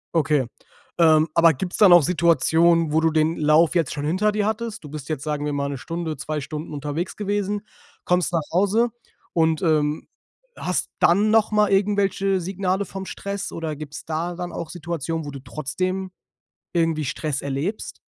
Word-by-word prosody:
Okay, 150 Hz, -4 st, +2 dB, 0.5 s
ähm, 160 Hz, -1 st, +5 dB
aber 165 Hz, -1 st, +5 dB
gibt's 180 Hz, +7 st, -4 dB
dann 195 Hz, -4 st, +7 dB
auch 175 Hz, -4 st, +7 dB
Situationen, 165 Hz, 0 st, +3 dB
wo 155 Hz, -, +3 dB
du 160 Hz, 0 st, +2 dB
den 155 Hz, +1 st, +1 dB
Lauf 155 Hz, +3 st, +4 dB
jetzt 165 Hz, -4 st, +1 dB
schon 145 Hz, -1 st, -4 dB
hinter 185 Hz, +7 st, +1 dB
dir 210 Hz, -1 st, 0 dB
hattest? 220 Hz, -1 st, -3 dB
Du 150 Hz, -, -9 dB
bist 150 Hz, -1 st, -7 dB
jetzt, 155 Hz, -4 st, -3 dB
sagen 150 Hz, -1 st, -2 dB
wir 150 Hz, -, -2 dB
mal, 140 Hz, 0 st, -1 dB
1 140 Hz, -, -4 dB
Stunde, 165 Hz, +2 st, -4 dB
2 150 Hz, +1 st, -3 dB
Stunden 150 Hz, +3 st, -6 dB
unterwegs 150 Hz, +4 st, -4 dB
gewesen, 205 Hz, 0 st, -2 dB, 0.4 s
kommst 180 Hz, 0 st, +1 dB
nach 165 Hz, -, +2 dB
Hause 205 Hz, +7 st, +2 dB, 0.4 s
und, 160 Hz, -2 st, +2 dB
ähm, 155 Hz, -2 st, +1 dB, 0.5 s
hast -, -, -2 dB
dann 205 Hz, +5 st, +4 dB
noch 220 Hz, -1 st, +3 dB
mal 210 Hz, -1 st, +3 dB
irgendwelche 195 Hz, -1 st, +1 dB
Signale 190 Hz, +2 st, -1 dB
vom 195 Hz, +1 st, -7 dB
Stress 200 Hz, +1 st, -5 dB
oder 160 Hz, -2 st, -4 dB
gibt's 150 Hz, -1 st, -8 dB
da 165 Hz, +2 st, -3 dB
dann 175 Hz, 0 st, -5 dB
auch 165 Hz, -, -6 dB
Situationen, 165 Hz, -2 st, -4 dB
wo 145 Hz, -, -6 dB
du 135 Hz, -, -8 dB
trotzdem 185 Hz, +8 st, -3 dB, 0.6 s
irgendwie 165 Hz, -3 st, +1 dB
Stress 145 Hz, +1 st, -3 dB
erlebst? 140 Hz, +10 st, -3 dB
165 Hz, 175 wpm, -23 LUFS, 155-190 Hz, 0.6 s, dann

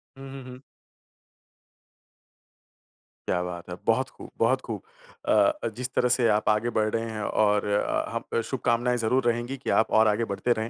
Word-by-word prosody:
हुँ, 135 Hz, 0 st, -10 dB
हुँ, 135 Hz, -1 st, -8 dB
हुँ। 125 Hz, 0 st, -11 dB, 2.7 s
क्या 90 Hz, -, +1 dB
बात 90 Hz, 0 st, -7 dB
है। 90 Hz, -, -4 dB
बहुत -, -, +2 dB
ख़ूब -, -, -12 dB
बहुत -, -, +3 dB
ख़ूब! -, -, -4 dB, 0.5 s
अ -, -, +5 dB, 0.3 s
अ, -, -, +1 dB
जिस 125 Hz, 0 st, -3 dB
तरह 125 Hz, -, +3 dB
से 120 Hz, -2 st, +2 dB
आप 110 Hz, -, -1 dB
आगे 105 Hz, +2 st, +2 dB
बढ़ 110 Hz, 0 st, +2 dB
रहे 115 Hz, 0 st, -1 dB
हैं 110 Hz, -1 st, -5 dB
और 105 Hz, 0 st, +2 dB
अ, 105 Hz, 0 st, 0 dB
हम -, -, -2 dB
शुभकामनाएँ 125 Hz, 0 st, 0 dB
ज़रूर 120 Hz, +3 st, +1 dB
रहेंगी 120 Hz, +3 st, -4 dB
कि 135 Hz, -, -6 dB
आप 110 Hz, -, +1 dB
और 110 Hz, -, +5 dB
आगे 110 Hz, +2 st, +1 dB
बढ़ते 120 Hz, +5 st, +1 dB
रहें। 110 Hz, +1 st, -2 dB
115 Hz, 180 wpm, -26 LUFS, 105-125 Hz, 2.7 s, अ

